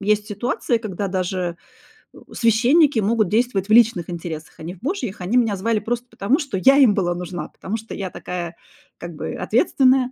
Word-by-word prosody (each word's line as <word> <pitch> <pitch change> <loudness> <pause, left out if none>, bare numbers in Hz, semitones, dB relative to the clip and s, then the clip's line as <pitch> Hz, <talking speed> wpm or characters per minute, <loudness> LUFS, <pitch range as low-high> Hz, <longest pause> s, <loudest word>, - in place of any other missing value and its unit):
есть 210 +1 +1
ситуации, 235 +3 -1
когда 205 -3 -4
даже, 180 -2 -2 0.6
э, - - -16 0.2
священники 250 +4 +3
могут 215 0 +2
действовать 215 -3 0
в 215 - +3
личных 225 -8 +4
интересах, 165 -2 -6
а - - -9
не 175 +3 -6
в - - -20
Божьих. 250 - -3
Они 185 +7 -2
меня 225 -4 +2
звали 220 +3 0
просто 240 +3 -3
потому, 240 - 0
что 275 - -3
я 270 +9 +5
им 260 -7 +6
была 175 -3 0
нужна, 175 0 -6
потому 205 - -6
что 225 0 -9
я 190 -2 -4
такая, 175 -1 -6 0.4
как 170 0 -8
бы, - - -5
ответственная. 255 - +2
210 Hz, 190 wpm, -21 LUFS, 180-240 Hz, 0.6 s, им